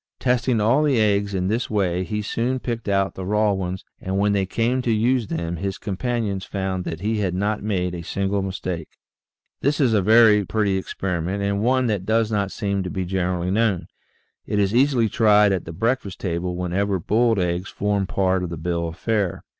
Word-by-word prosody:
Testing 125 -2 +1
all 115 +8 +3
the 145 -6 +2
eggs 100 -2 +1
in 90 0 0
this 115 +5 -1
way 95 -4 0
he 105 +2 -3
soon 120 +5 -1
picked 115 -4 -4
out 100 -1 +1
the 95 - -6
raw 105 +2 +2
ones, 95 -1 -4
and 95 +1 -3
when 100 +1 +2
they 95 -2 +1
came 120 +5 0
to 125 - -2
use 115 +1 +2
them 85 0 -3
his 95 +2 -3
companions 105 -1 -2
found 95 -2 -3
that 80 +1 -5
he 110 +2 0
had 95 -3 -1
not 105 +3 -1
made 90 -4 -1
a 85 - -5
single 100 +3 -1
mistake. 90 -4 -4 0.7
This 145 +2 0
is 130 -6 +3
a 105 - +3
very 110 0 +6
pretty 100 0 0
experiment 95 0 -2
and 100 0 0
one 130 +3 +2
that 105 -5 -1
does 110 0 +2
not 100 -2 0
seem 100 -1 -1
to 90 - -4
be 95 0 -3
generally 90 -1 -1
known. 105 -3 +1 0.6
It 105 - -1
is 100 0 +2
easily 125 -2 +3
tried 105 -2 +4
at 95 -3 -1
the 80 - -6
breakfast 115 +2 -1
table 90 -1 -2
whenever 95 +3 0
boiled 115 +5 +2
eggs 90 +1 -1
form 100 -1 -1
part 95 -1 +1
of 90 - -3
the 85 - -5
bill 85 +1 -2
of 80 - -7
fare. 105 -5 -1
100 Hz, 200 wpm, -23 LUFS, 95-110 Hz, 0.7 s, very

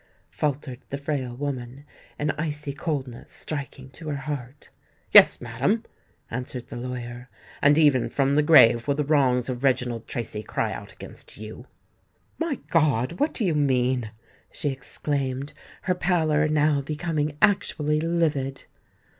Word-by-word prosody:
faltered 140 -4 -2
the 140 - -3
frail 140 -4 -3
woman, 135 0 -5 0.3
an 145 0 0
icy 150 -2 -3
coldness 140 -6 -4
striking 140 -3 -6
to 155 +4 -8
her 145 - -1
heart. 140 -1 -6 0.4
"Yes, - - +8
madam," 130 - 0 0.5
answered 125 0 -5
the - - -7
lawyer; 125 0 -6 0.3
"and 145 +1 +5
even 145 -6 +4
from 140 0 +1
the 150 - +4
grave 120 -6 +6
will 140 - +2
the 150 - 0
wrongs 130 -4 +2
of 125 0 -4
Reginald 125 -3 +1
Tracy 110 -3 -4
cry - - -2
out - - -8
against - - -10
you." 110 +3 -9 0.7
"My 330 -3 0 0.2
God! 150 -2 +2
what 295 +2 +2
do 225 - -1
you 175 - +2
mean?" 130 -5 +1 0.4
she 145 - -2
exclaimed, 135 0 -3 0.3
her 185 - +2
pallor 160 -4 +2
now 150 -1 +2
becoming 150 0 -2
actually 150 -7 +2
livid. 155 -5 0
140 Hz, 140 wpm, -25 LUFS, 125-150 Hz, 0.7 s, Yes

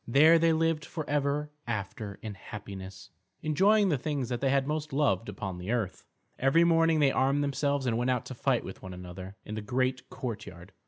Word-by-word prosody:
There 155 +7 +6
they 165 0 +4
lived 160 -1 +1
forever 150 -1 -1 0.2
after 105 -2 -4
in 110 -2 -4
happiness, 95 -1 -9 0.3
enjoying 195 +7 +4
the 145 -6 +1
things 140 -4 -2
that 120 -1 -2
they 135 - +2
had 135 0 +2
most 155 +1 -2
loved 130 -8 +1
upon 95 -3 -5
earth. 110 -6 -2 0.3
Every 135 +6 +4
morning 165 -1 +4
they 140 -2 +5
armed 135 +2 +2
themselves 140 -1 0
and 115 -2 +1
went 120 +1 +1
out 125 -2 0
to - - -6
fight 125 0 +1
with 95 - -8
one 95 -2 -8
another 90 +2 -8
in 105 - -6
the 110 - -3
great 130 +3 -1
courtyard. 100 -6 -6
130 Hz, 190 wpm, -29 LUFS, 105-150 Hz, 0.3 s, There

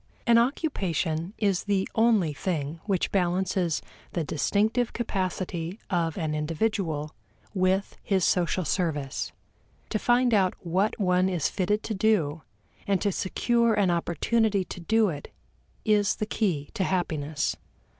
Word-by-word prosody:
An 235 -1 +6
occupation 190 - -1
is 200 -4 +1
the 200 -2 +1
only 220 -9 +3
thing 155 -1 -3
which 195 -4 0
balances 180 -2 0 0.3
the 170 - 0
distinctive 215 - +1
capacity 185 -5 -3
of 165 -3 0
an 160 -4 -1
individual 155 -1 -1 0.4
with 190 0 +1
his 190 -3 +1
social 180 0 +1
service. 150 -5 -1 0.6
To 215 - 0
find 245 +1 +3
out 190 -3 +3
what 190 +7 0
one 185 -1 +3
is 175 -5 0
fitted 205 +2 0
to 220 - -3
do 190 -7 +1 0.5
and 200 -2 +2
to 205 - +1
secure 235 +5 +1
an 200 -4 +3
opportunity 195 +4 +1
to - - -8
do 220 +4 +2
it 145 -4 -7 0.5
is 210 -1 +3
the 215 - -2
key 180 -10 -1
to 190 - -1
happiness. 155 -5 -1
185 Hz, 135 wpm, -27 LUFS, 165-210 Hz, 0.6 s, An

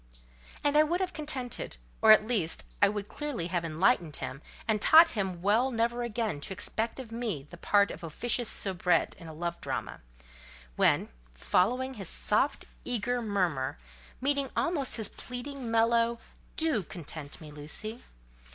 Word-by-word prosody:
And 290 0 +2
I 300 - +8
would 335 +4 +1
have 370 -1 -2
contented, 265 - -4 0.2
or, 220 - +8
at 215 0 +7
least, 205 -9 +1 0.2
I 200 - +7
would 205 0 -4
clearly 270 - -4
have 175 -1 -1
enlightened 165 - +2
him, 135 +3 -5 0.3
and 215 -2 +1
taught 325 +6 +8
him 190 -5 -3
well 220 +6 +3
never 235 0 0
again 225 -9 -2
to 190 - -3
expect 225 +6 -2
of 245 -4 -8
me 225 - -3
the - - -8
part 200 +3 +3
of 165 - -9
officious 235 +8 -1
soubrette 185 -2 +1
in 165 - -10
a - - -7
love 170 +2 -4
drama; - - -4 0.7
when, - - +3 0.3
following 250 - +1
his, 195 -8 -6
soft, 240 +7 +1 0.2
eager, 245 0 -1
murmur, 180 - 0 0.4
meeting 280 0 +1
almost 315 -8 +1
his 220 -3 0
pleading, 250 +2 -6
mellow—"Do 230 +4 +1
content 155 -4 -8
me, 155 -3 -10
Lucy!" 185 +11 -6
220 Hz, 150 wpm, -30 LUFS, 175-250 Hz, 0.7 s, I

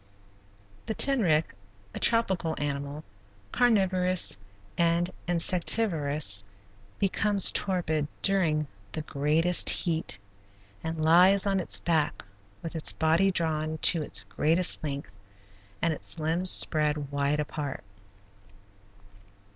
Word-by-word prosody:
The 220 - -3
tenric, 190 - +1 0.4
a - - -6
tropical 190 -8 +1
animal, 145 +1 -4 0.5
carnivorous 185 -6 +1 0.4
and 170 +1 +1 0.2
insectivorous, 165 - +1 0.5
becomes 200 0 +2
torpid 160 -6 -1 0.2
during 170 -6 +1 0.3
the 155 - -4
greatest 155 +5 +2
heat, 165 - -1 0.7
and 160 -1 -4
lies 185 +5 +5
on 195 -1 0
its 180 - -3
back 160 -8 -1 0.4
with 165 0 -7
its 160 - -1
body 165 +5 +2
drawn 160 -3 -2
to 165 - +5
its 100 -8 +1
greatest 160 - 0
length, 140 -1 -5 0.7
and 165 -1 +1
its 155 - -1
limbs 165 +4 +1
spread 150 -4 +2
wide 140 +1 -1
apart. 150 -2 -5
165 Hz, 100 wpm, -27 LUFS, 150-185 Hz, 0.7 s, lies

